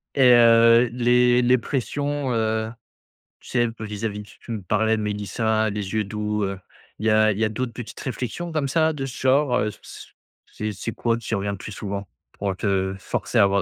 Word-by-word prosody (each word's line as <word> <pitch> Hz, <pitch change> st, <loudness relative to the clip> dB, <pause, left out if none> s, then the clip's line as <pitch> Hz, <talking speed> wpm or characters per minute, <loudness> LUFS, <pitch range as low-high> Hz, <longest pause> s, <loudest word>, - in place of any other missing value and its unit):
Et 125 Hz, -3 st, +6 dB
heu, 115 Hz, 0 st, +6 dB
les 125 Hz, 0 st, +3 dB
les 125 Hz, +1 st, +4 dB
pressions, 140 Hz, +2 st, -2 dB
heu, 110 Hz, 0 st, 0 dB, 0.7 s
tu -, -, -15 dB
sais 120 Hz, -2 st, +2 dB
un 115 Hz, -, -2 dB
peu 110 Hz, -1 st, -8 dB
vis 105 Hz, +1 st, -6 dB
à -, -, +2 dB
vis 105 Hz, 0 st, -6 dB
tu 105 Hz, -, -17 dB
tu 115 Hz, -, -8 dB
me 105 Hz, -3 st, -4 dB
parlais 110 Hz, +4 st, +1 dB
de 110 Hz, -, -3 dB
Melissa, 110 Hz, +1 st, 0 dB
les 100 Hz, -1 st, -4 dB
yeux 110 Hz, -1 st, 0 dB
doux 105 Hz, 0 st, -2 dB
heu, 100 Hz, 0 st, -3 dB, 0.4 s
Il 110 Hz, -, -2 dB
y -, -, +4 dB
a 110 Hz, 0 st, +4 dB
il 100 Hz, -, -5 dB
y 115 Hz, -, +2 dB
a -, -, +2 dB
d'autres 120 Hz, +2 st, -3 dB
petites 120 Hz, -1 st, -8 dB
réflexions 130 Hz, +6 st, -4 dB
comme 150 Hz, -3 st, -1 dB
ça 160 Hz, +2 st, +2 dB
de 135 Hz, -3 st, -4 dB
ce 130 Hz, -, -6 dB
genre? 130 Hz, -1 st, +3 dB
Heu, 105 Hz, -, 0 dB
c' -, -, -13 dB, 0.3 s
c'est 105 Hz, 0 st, -5 dB
c'est 110 Hz, +3 st, -5 dB
quoi 115 Hz, -1 st, 0 dB
qui 115 Hz, -1 st, -4 dB
revient 100 Hz, 0 st, -2 dB
plus 105 Hz, -, -8 dB
souvent? 100 Hz, 0 st, -5 dB, 0.3 s
Pour 100 Hz, -2 st, -3 dB
te 95 Hz, -2 st, 0 dB
forcer 120 Hz, -, -2 dB
à -, -, +7 dB
avoir 100 Hz, 0 st, +3 dB
110 Hz, 225 wpm, -23 LUFS, 105-125 Hz, 0.7 s, à